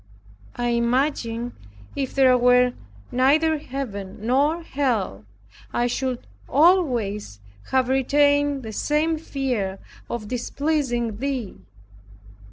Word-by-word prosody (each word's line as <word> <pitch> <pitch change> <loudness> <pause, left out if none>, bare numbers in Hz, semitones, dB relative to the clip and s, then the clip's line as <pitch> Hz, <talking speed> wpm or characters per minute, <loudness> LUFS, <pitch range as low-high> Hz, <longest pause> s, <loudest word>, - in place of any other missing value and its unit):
I 240 0 -1
imagine 235 0 0 0.4
if 270 -2 -3
there 260 -2 +5
were 250 0 +4 0.4
neither 300 +5 +3
Heaven 220 -9 -6
nor 280 +9 +1
Hell, 230 - -1 0.5
I 240 - +1
should 250 0 -2 0.2
always 245 - +2 0.3
have 260 -1 +2
retained 285 +1 +2
the 220 -1 -7
same 310 +6 0
fear 250 -11 -2 0.3
of 235 -3 -4
displeasing 245 -2 -1
Thee. 255 - -3
255 Hz, 95 wpm, -23 LUFS, 235-285 Hz, 0.5 s, there